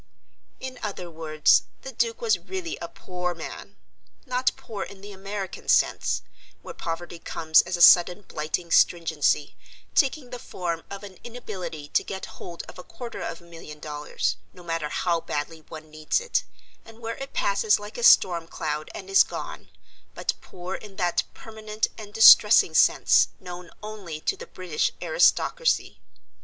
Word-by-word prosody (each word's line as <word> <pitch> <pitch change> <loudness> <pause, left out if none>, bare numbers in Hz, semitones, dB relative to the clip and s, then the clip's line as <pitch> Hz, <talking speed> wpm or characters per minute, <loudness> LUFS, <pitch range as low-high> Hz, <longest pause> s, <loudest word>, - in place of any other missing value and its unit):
In 260 -1 -7
other 185 -5 -5
words 155 -1 +3 0.2
the - - -6
Duke 470 +1 -1
was 460 -2 +2
really 375 -3 -5
a 170 - -6
poor 180 0 -5
man 165 - -8 0.5
not 255 0 +1
poor 215 -4 -7
in 195 0 -7
the 205 +1 -9
American 195 -1 -6
sense, - - +2 0.4
where - - -8
poverty 170 +1 -5
comes 160 -1 +3
as 175 +1 -3
a 170 - +5
sudden 180 +4 +7
blighting 160 +1 -4
stringency, 160 -4 +2 0.4
taking 275 -2 +1
the 245 - -6
form 170 -6 -4
of 200 +1 -8
an 195 -3 -11
inability 195 -11 -7
to - - +2
get 190 -1 -6 0.2
hold 170 -1 -7
of - - -12
a - - -8
quarter 240 +3 -8
of 165 - -5
a - - -18
million 165 -3 -11
dollars, 150 -1 -3 0.2
no 180 - -14
matter 165 -3 -3
how 170 +2 0
badly 160 +2 -4
one 155 -1 -10
needs 155 - 0
it, 485 0 -1 0.4
and 225 0 -15
where 230 0 -5
it 270 0 -8
passes 200 +1 +2
like 205 +2 -9
a - - -4
storm 170 -7 +5
cloud 155 -1 -4
and 190 - -8
is 195 0 +6
gone, - - -4 0.5
but - - -1
poor 180 +1 -8
in 205 0 -8
that 175 -2 +1
permanent 220 -1 -3
and 210 -2 -10
distressing 210 -4 +8
sense - - +5
known 175 -1 -9
only 200 -7 -7
to - - -1
the - - -10
British 180 -4 -2
aristocracy. - - +2
185 Hz, 165 wpm, -25 LUFS, 165-220 Hz, 0.5 s, distressing